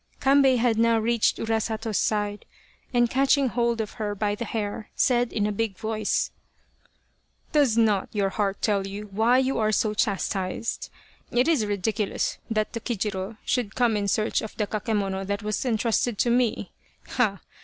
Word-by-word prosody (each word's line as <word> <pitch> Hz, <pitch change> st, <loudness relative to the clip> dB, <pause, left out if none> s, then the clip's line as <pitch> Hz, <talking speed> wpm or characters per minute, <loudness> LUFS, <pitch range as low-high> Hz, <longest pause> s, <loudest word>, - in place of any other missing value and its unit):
Kambei 270 Hz, -1 st, +4 dB
had 230 Hz, -2 st, +2 dB
now 230 Hz, 0 st, +4 dB
reached 230 Hz, 0 st, +2 dB
Urasato's 220 Hz, -1 st, -1 dB
side, 205 Hz, -1 st, -1 dB, 0.5 s
and 240 Hz, -1 st, +3 dB
catching 270 Hz, +2 st, +3 dB
hold 235 Hz, -1 st, 0 dB
of 215 Hz, -2 st, -2 dB
her 205 Hz, -1 st, -2 dB
by 205 Hz, 0 st, 0 dB
the 220 Hz, +3 st, -4 dB
hair, 210 Hz, -1 st, -4 dB
said 245 Hz, -1 st, +2 dB
in 205 Hz, -, 0 dB
a 210 Hz, -, 0 dB
big 205 Hz, -2 st, -2 dB
voice, 215 Hz, -1 st, -1 dB, 0.6 s
" -, -, -41 dB
Does 280 Hz, -7 st, +3 dB
not 215 Hz, -4 st, +2 dB
your 200 Hz, -2 st, 0 dB
heart 200 Hz, -1 st, -2 dB
tell 200 Hz, -3 st, +1 dB
you 200 Hz, +2 st, -6 dB
why 225 Hz, +5 st, +3 dB
you 265 Hz, -1 st, +1 dB
are 215 Hz, -1 st, +2 dB
so 215 Hz, 0 st, +1 dB
chastized? 195 Hz, 0 st, -2 dB, 0.4 s
It 245 Hz, +4 st, +2 dB
is 285 Hz, -11 st, +2 dB
ridiculous 205 Hz, +1 st, -1 dB
that 215 Hz, -1 st, -1 dB
Tokijiro 210 Hz, -3 st, -3 dB
should 240 Hz, -6 st, -1 dB
come 240 Hz, -3 st, +2 dB
in 205 Hz, -1 st, -1 dB
search 215 Hz, +3 st, +1 dB
of 220 Hz, -, -8 dB
the 210 Hz, -, +1 dB
kakemono 205 Hz, -2 st, -2 dB
that 200 Hz, +1 st, -2 dB
was 210 Hz, 0 st, -1 dB
entrusted 230 Hz, -1 st, +1 dB
to 240 Hz, -, +2 dB
me. 240 Hz, -2 st, +1 dB, 0.4 s
Ha 210 Hz, -6 st, +1 dB
220 Hz, 165 wpm, -25 LUFS, 205-235 Hz, 0.6 s, Kambei